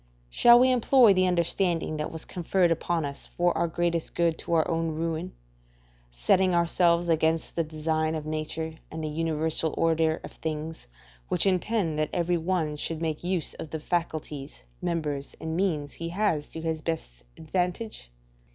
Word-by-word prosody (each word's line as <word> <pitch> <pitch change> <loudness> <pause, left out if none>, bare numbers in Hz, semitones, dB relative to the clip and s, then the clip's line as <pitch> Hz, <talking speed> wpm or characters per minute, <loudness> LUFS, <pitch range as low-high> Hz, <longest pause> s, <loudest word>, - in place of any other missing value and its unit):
Shall 240 - +7
we 255 +1 +5
employ 250 -2 +6
the 185 0 +3
understanding 170 -2 +1
that 150 - -3
was 160 -1 -7
conferred 180 0 +1
upon 165 -1 0
us 140 0 -6
for 175 0 +2
our 170 - +1
greatest 170 0 -1
good 170 -2 +2
to - - -4
our 160 - +3
own 165 -1 0
ruin; 165 +2 -3 0.8
setting 175 - +2
ourselves 170 0 +3
against 160 0 +1
the 165 - +1
design 155 0 -1
of 155 -1 -4
nature 155 +1 -4
and 160 0 -6
the - - -1
universal 160 0 0
order 160 -1 +2
of - - -8
things, 160 - -5 0.4
which - - 0
intend 185 -4 +1
that 155 - 0
every 175 0 +1
one 160 -3 -1
should 160 +1 -3
make 160 -1 -3
use 180 -2 0
of 155 - -8
the 160 - -4
faculties, 155 - -3 0.2
members, 150 -5 -2
and 160 0 -4
means 160 -6 0
he 165 0 -5
has 170 -5 0
to 160 - -7
his 160 -1 -2
own - - -18
best - - -4
advantage? 180 - -3
165 Hz, 170 wpm, -27 LUFS, 155-175 Hz, 0.8 s, Shall